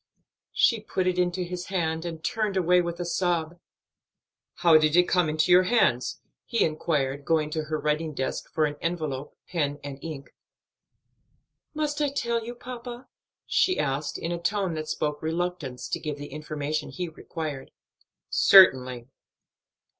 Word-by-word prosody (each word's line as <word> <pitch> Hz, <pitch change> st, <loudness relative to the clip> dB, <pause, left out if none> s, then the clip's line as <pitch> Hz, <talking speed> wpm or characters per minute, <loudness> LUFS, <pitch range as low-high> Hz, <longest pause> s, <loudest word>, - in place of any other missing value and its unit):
She 230 Hz, -, +4 dB
put 190 Hz, -3 st, -2 dB
it 180 Hz, 0 st, +1 dB
into 180 Hz, 0 st, +1 dB
his 180 Hz, 0 st, -5 dB
hand 165 Hz, -3 st, -1 dB
and 165 Hz, -2 st, -6 dB
turned 215 Hz, -1 st, -1 dB
away 180 Hz, 0 st, +4 dB
with 170 Hz, 0 st, -4 dB
a 175 Hz, -, -2 dB
sob. 175 Hz, -1 st, -1 dB, 1.0 s
"How 170 Hz, -2 st, +5 dB
did 155 Hz, 0 st, +2 dB
it 180 Hz, -, +7 dB
come 180 Hz, -3 st, +2 dB
into 155 Hz, +3 st, +1 dB
your 180 Hz, +1 st, +8 dB
hands?" 155 Hz, -, +2 dB, 0.2 s
he 230 Hz, -, +1 dB
inquired, 145 Hz, -3 st, -1 dB
going 155 Hz, -1 st, +1 dB
to 155 Hz, 0 st, -2 dB
her 155 Hz, 0 st, -2 dB
writing 150 Hz, +1 st, -1 dB
desk 130 Hz, -, -3 dB
for 155 Hz, -, +2 dB
an 145 Hz, 0 st, -3 dB
envelope, 155 Hz, -5 st, -3 dB
pen 145 Hz, -5 st, -1 dB
and 140 Hz, -1 st, -7 dB
ink. 150 Hz, -4 st, -7 dB, 1.4 s
"Must 300 Hz, -1 st, -1 dB
I 295 Hz, -, +2 dB
tell 235 Hz, -4 st, -1 dB
you, 240 Hz, +2 st, -7 dB
papa?" 245 Hz, 0 st, -8 dB, 0.4 s
she 370 Hz, -, +2 dB
asked; 140 Hz, +2 st, -1 dB
in 165 Hz, -, -4 dB
a 170 Hz, -, -2 dB
tone 195 Hz, 0 st, 0 dB
that 155 Hz, -1 st, -4 dB
spoke 150 Hz, -1 st, -2 dB
reluctance 165 Hz, -5 st, -3 dB
to -, -, -2 dB
give 150 Hz, -2 st, -4 dB
the 145 Hz, 0 st, -8 dB
information 150 Hz, 0 st, -3 dB
he 180 Hz, -1 st, -4 dB
required. 155 Hz, -3 st, -6 dB, 0.6 s
"Certainly." 130 Hz, -10 st, +6 dB
165 Hz, 155 wpm, -26 LUFS, 150-180 Hz, 1.4 s, your